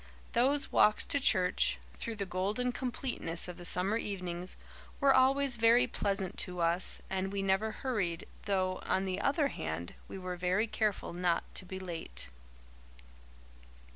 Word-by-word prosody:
Those 275 +4 +2
walks 210 - +4
to 285 - +2
church, 185 -8 +3 0.2
through 230 - -5
the 200 -2 -3
golden 205 +7 -1
completeness 245 -9 -3
of 180 - -7
the 175 - -9
summer 185 +6 +3
evenings, 180 -4 -4 0.4
were 275 -1 +5
always 265 0 +4
very 230 +2 +6
pleasant 195 -1 -2
to 180 -2 -1
us, 170 +2 +1
and 190 0 -2
we 200 -1 -2
never 195 +3 +1
hurried, 200 -10 -2 0.2
though, 185 -2 0
on 190 - +1
the 190 +1 -2
other 280 +3 +2
hand, 80 - -4
we - - -7
were 185 -1 -5
very 185 +5 +1
careful 215 -5 -1
not 175 -1 +1
to - - -3
be 190 +1 -6
late. 175 - -6
195 Hz, 150 wpm, -32 LUFS, 180-230 Hz, 0.4 s, very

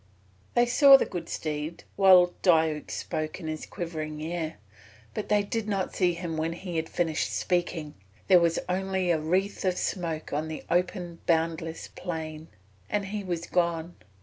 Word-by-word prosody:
They 240 - +5
saw 275 +3 +8
the - - 0
good 170 -3 -6
steed 155 +1 -4
while 185 -2 +7
Diuk 160 -4 +3
spoke 155 0 -3
in 170 - -8
his 155 0 -4
quivering 155 -3 -5
ear, 160 0 -3 0.6
but 215 - -4
they 210 -1 +3
did 220 +1 -3
not 195 -3 -1
see 180 -2 +2
him 170 -2 -4
when 160 +1 -1
he 175 -1 -5
had 160 0 -2
finished 160 -2 0
speaking 170 -4 -1 0.3
there 185 -2 +7
was 170 -1 +2
only 190 0 0
a 160 - +2
wreath 185 +6 0
of 185 -2 +1
smoke 165 -5 -3
on 155 +2 -1
the 160 -1 -6
open 175 -1 -1
boundless 165 0 0
plain, 160 -3 -6 0.4
and 205 -1 0
he 205 +1 -4
was 175 -2 -3
gone. 170 -1 0
170 Hz, 165 wpm, -28 LUFS, 160-185 Hz, 0.6 s, saw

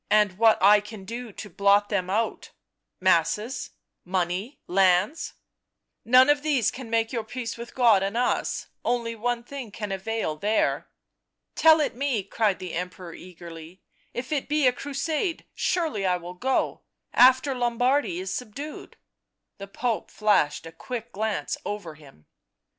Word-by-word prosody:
" - - -48
And 195 -1 -11
what 225 -1 +6
I 205 +1 +8
can 210 -1 -10
do 235 +2 -6
to 210 - -8
blot 200 +2 +3
them 185 -3 -1
out 220 +4 -1 0.3
— - - -57
masses, 185 - +1 0.3
money, 185 +7 -2
lands 190 - +2 0.2
" - - -58
" 230 - -18
Hone 255 +1 +8
of 290 0 +3
these 280 -8 +1
can 255 -3 -9
make 225 +1 0
your 230 -2 -1
peace 235 +1 -5
with 235 +1 -9
God 230 -6 +5
and 200 +4 -2
us 245 - 0
— - - -53
one 235 0 -1
thing 275 +1 -7
only - - -16
can 210 0 -5
avail 195 -3 -2
there." 210 +6 0 0.3
" - - -57
Tell 320 0 +6
it 295 - 0
me," 255 -5 -1
cried 205 0 0
the 180 -2 -7
Emperor 180 0 -5
eagerly. 170 0 -11
" - - -37
If 255 +3 -5
it 295 -2 -1
be 300 -1 +2
a 250 - +5
crusade, 300 +6 -2
surely 315 - -1
I 180 -1 +2
will 175 +1 -8
go 255 +9 -1 0.2
— - - -46
after 260 +2 +5
Lombardy 245 -3 +1
is 190 +1 -4
subdued." 255 +7 -7 0.6
The 200 - -7
Pope 230 +2 -2
flashed 200 -9 +1
a 165 - -8
quick 235 +7 -7
glance 215 +1 -2
over 205 -6 -5
him. 140 - -18
220 Hz, 170 wpm, -26 LUFS, 190-250 Hz, 0.6 s, I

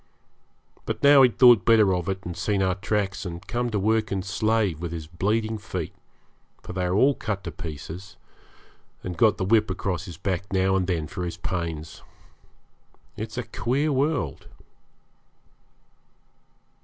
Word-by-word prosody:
But - - -3
now 140 -1 +8
he 130 - +7
had 105 - -14
thought 120 -3 +7
better 110 -4 +5
of 90 0 -2
it, 95 +1 -3
and 90 -1 -5
seen 95 +2 0
our 95 -1 +2
tracks 100 -1 -2
and 85 -1 -7
come 120 +3 -1
to 110 - -1
work 110 +2 +1
and 95 -2 -2
slave, 105 -4 0
with 85 -2 -4
his 80 -2 -5
bleeding 110 +7 -1
feet 90 -5 -5 0.7
for - - -7
they 90 -1 -1
were 130 +10 +4
cut 110 -6 -3
all - - -24
to 85 - -5
pieces 80 +4 -8 0.9
and 90 - -4
got 105 +3 +4
the 95 - -1
whip 110 +1 +3
across 95 -1 -2
his 85 -6 -9
back 95 +1 -3
now 95 0 +2
and 95 -2 0
then 85 -4 -1
for 90 +4 -5
his 85 -1 -4
pains. 80 -4 -4 1.1
It's 110 +2 -6
a 125 - -1
queer 140 +7 -1
world! 140 - -1
95 Hz, 165 wpm, -25 LUFS, 90-110 Hz, 1.1 s, now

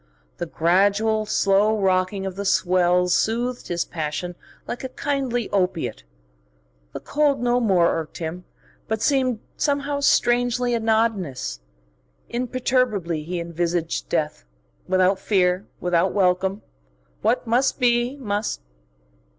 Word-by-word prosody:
The 175 - -4
gradual, 205 +7 +2
slow 210 +1 +2
rocking 190 0 +1
of 190 -1 -4
the 200 - -4
swells 180 -2 +2
soothed 240 +3 0
his 175 -1 -1
passion 160 +2 -4 0.3
like 245 - -5
a 260 - -4
kindly 255 -4 -2
opiate. 180 - -1 0.9
The - - -5
cold 290 -2 +1
no 245 0 +2
more 180 -8 +3
irked 160 - -7
him, 170 +2 -5 0.4
but 220 -1 -2
seemed 260 -5 +1 0.2
somehow 285 -1 0
strangely 245 -2 +2
anodynous. 220 - 0 0.7
Imperturbably 240 -8 0
he 175 +3 -4
envisaged 170 0 -2
death, 150 - -1 0.4
without 185 +1 +3
fear, 185 -1 +1
without 175 -1 +1
welcome. 190 +1 +1 0.6
What 230 +4 +1
must 245 +5 +1
be, 240 +1 +2
must.... 210 - -2
200 Hz, 115 wpm, -23 LUFS, 180-240 Hz, 0.9 s, more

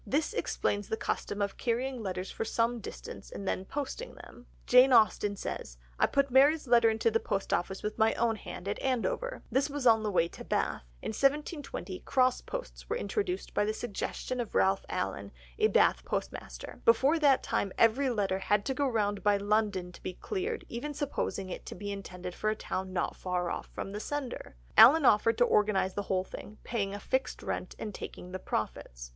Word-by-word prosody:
This 300 +9 0
explains 205 - -1
the 220 - -1
custom 205 -2 -2
of 200 -1 -3
carrying 250 +1 -1
letters 185 -2 -4
for - - -3
some 230 +1 0
distance 210 - -9
and 195 - -7
then 190 - -1
posting 290 - -5
them; 245 - -14 0.2
Jane 250 +2 +7
Austen 210 -3 +4
says, - - -6 0.2
"I - - +5
put 280 -1 +1
Mary's 285 +3 +5
letter 235 -1 +6
into 220 +1 +1
the 225 - +2
post 195 -3 -2
office 190 +2 -1
with 210 0 -3
my 220 0 +4
own 230 -1 +1
hand 180 -1 -8
at 200 - -2
Andover," 270 - -1
this 275 +3 +2
was 285 -2 -4
on 225 -2 +6
the 215 - -1
way 175 -4 +2
to - - -10
Bath. - - -1 0.2
In - - -2
1720 290 - -1
cross 255 -1 +2
posts - - -7
were - - 0
introduced 400 -6 -2
by - - +2
the 215 +1 -1
suggestion 240 +3 -4
of 235 -3 -4
Ralph 195 0 +3
Allen, 100 +1 -3 0.3
a - - +5
Bath - - +3
postmaster; - - -5
before 270 +8 +4
that 280 -4 +4
time 200 - -1
every 255 +4 +4
letter 200 -5 0
had 205 +1 +1
to 265 - 0
go 280 +1 +1
round 205 -4 0
by 205 -1 +3
London 205 -3 0
to - - -14
be 185 - -4
cleared, 430 +3 -3
even 285 +5 -5
supposing 280 -9 -2
it - - -6
to - - -6
be 205 +2 -5
intended 180 -2 -6
for 215 - -1
a 215 - 0
town 190 -3 -4
not 185 - -1
far 180 -1 -2
off - - -4
from 195 - -6
the 205 - -4
sender. 270 - -5 0.2
Allen 280 +6 +9
offered 225 0 +4
to 245 - +5
organise 200 -4 +2
the 205 - -2
whole 185 -1 +2
thing, 210 +2 -10
paying 200 -4 -2
a - - -6
fixed 260 +5 -2
rent, - - -4
and 210 -2 -5
taking 180 -1 -8
the 185 - -4
profits. - - -4
220 Hz, 200 wpm, -30 LUFS, 195-265 Hz, 0.3 s, Allen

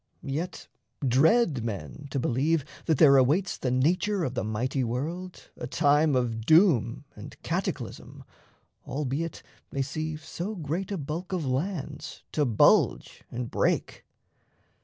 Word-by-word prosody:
Yet 160 +6 -4 0.4
dread 145 - +3
men 110 - -6
to 140 - -3
believe 135 +4 +1 0.2
that 160 - +3
there 140 -2 +7
awaits 160 +8 +2
The 130 - -2
nature 180 +10 +1
of 130 - -2
the 125 - -2
mighty 125 +5 -1
world 160 +10 -4
a - - -6
time 145 +1 +3
Of 115 -3 -1
doom 145 - +4
and - - -11
cataclysm, - - -4 0.6
albeit 150 +3 -3 0.3
they 135 - -1
see 155 +3 -4
So 175 +7 -5
great 170 +3 -3
a 200 - -1
bulk 165 +5 -5
of 175 -5 -1
lands 145 +2 -3
to 150 - +1
bulge 115 -5 +3
and 120 0 -5
break! - - 0
145 Hz, 135 wpm, -27 LUFS, 130-165 Hz, 0.6 s, there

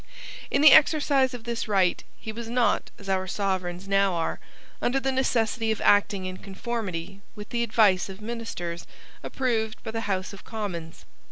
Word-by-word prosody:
In 280 - +2
the 305 - +10
exercise 280 -4 +5
of 235 - -9
this 235 -1 -3
right 190 -4 +2
he 220 - -6
was 230 +1 -7
not, 235 -3 +1
as 200 - -13
our 190 -1 0
sovereigns 185 -2 -2
now 195 -2 +2
are, 165 -1 -2 0.4
under 260 +3 +1
the 270 0 0
necessity 230 -3 0
of 220 - -2
acting 205 -2 +3
in 185 0 -5
conformity 195 -3 -5
with 210 0 -9
the 235 - -1
advice 210 -5 +3
of 190 0 -9
ministers 210 -7 -5 0.3
approved 225 -4 -2
by 225 - -5
the 225 -2 -4
House 190 0 -2
of 195 - -11
Commons. 180 -7 -6
210 Hz, 170 wpm, -26 LUFS, 190-235 Hz, 0.4 s, the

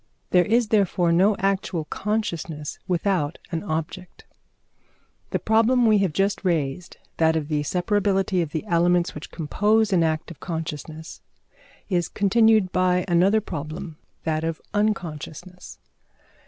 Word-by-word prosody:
There 180 -1 +5
is 225 +1 +2
therefore 190 -5 +2
no 190 +5 +4
actual 190 -4 -1
consciousness 170 -7 -3
without 180 -3 0
an 165 -2 -2
object. 175 +1 -5 1.0
The - - 0
problem 230 +3 +3
we 215 -2 +5
have 195 -4 +1
just 195 +5 0
raised, 170 -1 -2 0.2
that 160 0 +3
of 155 -2 -2
the 150 -1 0
separability 195 +2 +1
of 165 - -2
the 160 +6 -3
elements 175 -2 +2
which 150 - -8
compose 210 +6 +1
an 175 - +4
act 160 0 -1
of 165 - -12
consciousness, 160 -1 -6 0.7
is 175 -4 0
continued 215 -1 +3
by 180 -1 +2
another 190 +5 +3
problem 160 -2 -6 0.2
that 155 -1 -1
of 165 -1 -2
unconsciousness. 180 -3 -3
180 Hz, 130 wpm, -24 LUFS, 160-200 Hz, 1.0 s, There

